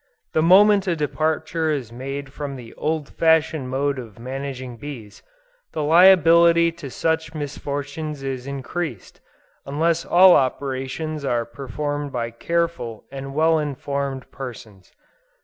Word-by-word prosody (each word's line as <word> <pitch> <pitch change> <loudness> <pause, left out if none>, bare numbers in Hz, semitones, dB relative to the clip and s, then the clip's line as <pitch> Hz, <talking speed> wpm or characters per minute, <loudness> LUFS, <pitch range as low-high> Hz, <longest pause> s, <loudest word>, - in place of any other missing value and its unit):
The 155 - +3
moment 200 +4 +6
a 175 - +1
departure 160 +1 -1
is 135 -7 -2
made 135 +3 -6
from 145 -2 -5
the 120 -3 -10
old 155 -2 -2
fashioned 160 -4 +2
mode 140 +1 -1
of 115 -5 -10
managing 130 0 -6
bees, 115 -6 -9 0.5
the 155 - -2
liability 170 0 +6
to 165 -4 -9
such 160 +3 -1
misfortunes 145 0 -5
is 135 -1 -4
increased, 140 - -5 0.4
unless 165 +4 0
all 185 +1 +7
operations 135 +3 -2
are 120 -4 0
performed 145 +4 -4
by 115 -2 -3
careful 165 -4 -2
and 135 0 -7
well 160 +1 +3
informed 140 -2 -4
persons. 115 -7 -9
145 Hz, 125 wpm, -22 LUFS, 130-160 Hz, 0.5 s, all